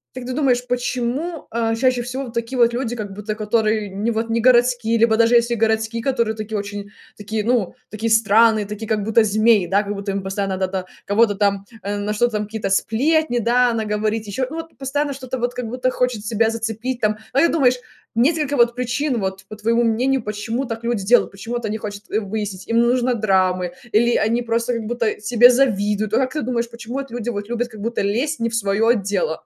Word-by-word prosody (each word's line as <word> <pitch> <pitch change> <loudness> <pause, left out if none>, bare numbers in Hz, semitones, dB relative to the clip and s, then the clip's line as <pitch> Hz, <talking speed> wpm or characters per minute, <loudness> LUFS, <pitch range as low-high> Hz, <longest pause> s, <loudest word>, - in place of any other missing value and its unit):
как 255 -1 -6
ты 255 - -4
думаешь, 250 -3 +1
почему, 250 +6 -2
а, 225 0 0
чаще 250 +1 +2
всего 255 +2 -5
такие 235 +2 -4
вот 235 -1 +4
люди, 240 -1 -2
как 205 -4 -6
будто 210 +1 -5
которые 215 -1 0
не 205 +4 -2
вот 225 0 -2
не 230 0 +1
городские, 240 -1 +3
либо 225 0 +4
даже 230 +1 +4
если 235 0 +3
городские, 220 0 0
которые 235 -3 0
такие 215 0 -4
очень 200 0 -5 0.3
такие, 210 +1 -3
ну 230 -4 0 0.2
такие 220 +2 -2
странные, 220 0 +4
такие 210 +2 -6
как 215 -1 0
будто 220 +2 +3
змеи, 215 -2 +3
да, 200 +2 +2
как 205 0 -4
будто 200 0 -4
им 195 0 -3
постоянно 195 0 -2
надо 190 0 -1
там 190 -1 -3 0.2
кого-то 205 +1 +3
там, 200 -1 0 0.2
э, 205 +1 -2
на 205 +1 -2
что 240 +3 +2
там 210 -2 -2
какие-то 210 -2 -4
сплетни, 270 +7 +1
да, 245 +2 +3
она 225 -2 -1
говорит 215 +1 -1
ещё, 230 +6 -2
ну 310 - -7
вот 325 0 -7
постоянно 280 +2 -1
что-то 260 -1 -5
вот 245 0 -2
как 250 -2 -4
будто 250 +2 -1
хочет 250 -5 -1
себя 220 +1 +1
зацепить 225 +2 -3
там. 215 -1 +1 0.2
А - - -1
как 280 - +6
ты - - -2
думаешь, 260 -6 +4 0.4
несколько 290 +3 +1
вот 240 0 +4
причин 250 +1 -1
вот, 190 -1 -4
по 215 - -8
твоему 230 +3 +1
мнению, 245 +3 +1
почему 215 +5 -3
так 230 -2 -6
люди 230 -4 -1
делают, 245 +4 +4
почему 200 +5 -6
вот 240 -1 -3
они 215 0 -2
хочат 205 -1 -7
выяснить, 205 -2 -3
им 230 0 +2
нужно 245 +1 +2
драмы, 185 -5 +1 0.2
или 235 +2 +3
они 230 +2 +1
просто 230 +1 -1
как 230 -1 -3
будто 235 -2 0
тебе 245 +3 +6
завидуют? 210 -5 +1
Ну - - +4
вот 265 - +3
как 255 - -3
ты 305 - -2
думаешь, 235 -1 -2
почему 235 +1 -8
вот 275 -1 -4
люди 240 0 -4
вот 205 -3 -4
любят 240 0 -1
как 220 -3 -12
будто 230 +2 -2
лезть 240 +10 -1
не 230 0 0
в 225 - -4
свое 220 +2 +2
дело? 195 -6 -2
230 Hz, 220 wpm, -21 LUFS, 210-245 Hz, 0.4 s, как